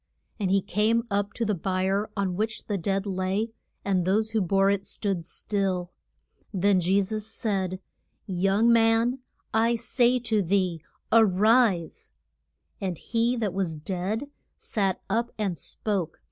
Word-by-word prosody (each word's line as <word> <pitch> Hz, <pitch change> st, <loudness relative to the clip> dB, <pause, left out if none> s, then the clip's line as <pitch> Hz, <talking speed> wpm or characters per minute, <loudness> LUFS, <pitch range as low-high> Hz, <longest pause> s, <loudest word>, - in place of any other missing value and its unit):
] -, -, -43 dB
And 195 Hz, -3 st, 0 dB
he 195 Hz, 0 st, +3 dB
came 215 Hz, +4 st, +1 dB
up 200 Hz, +1 st, 0 dB
to 230 Hz, -, -2 dB
the 210 Hz, -, +1 dB
bier 190 Hz, +3 st, 0 dB
on 190 Hz, -3 st, 0 dB
which 220 Hz, +3 st, -2 dB
the 205 Hz, -, -2 dB
dead 195 Hz, +3 st, -1 dB
lay, 195 Hz, +3 st, -1 dB, 0.3 s
and 190 Hz, -3 st, +2 dB
those 215 Hz, +4 st, +1 dB
who 220 Hz, -1 st, +1 dB
bore 195 Hz, +2 st, +3 dB
it 200 Hz, -1 st, -1 dB
stood 195 Hz, -5 st, -3 dB
still. 185 Hz, -2 st, -2 dB, 0.6 s
Then 195 Hz, -1 st, +3 dB
Je 185 Hz, +3 st, +3 dB
sus 215 Hz, +2 st, -3 dB
said, 190 Hz, -4 st, -2 dB, 0.5 s
Young 195 Hz, +5 st, +3 dB
man, 230 Hz, +2 st, +3 dB, 0.3 s
I 230 Hz, +2 st, +3 dB
say 245 Hz, +2 st, +2 dB
to 225 Hz, -3 st, 0 dB
thee 185 Hz, -3 st, 0 dB, 0.3 s
a 225 Hz, 0 st, +7 dB
rise. 210 Hz, -2 st, +2 dB, 0.7 s
And 185 Hz, -4 st, -2 dB
he 235 Hz, +5 st, 0 dB
that 210 Hz, -5 st, -1 dB
was 185 Hz, -4 st, -1 dB
dead 190 Hz, -, -3 dB, 0.3 s
sat 195 Hz, -4 st, -1 dB
up 230 Hz, +4 st, 0 dB
and 200 Hz, -5 st, -1 dB
spoke. 185 Hz, -1 st, -3 dB
200 Hz, 150 wpm, -26 LUFS, 185-220 Hz, 0.7 s, a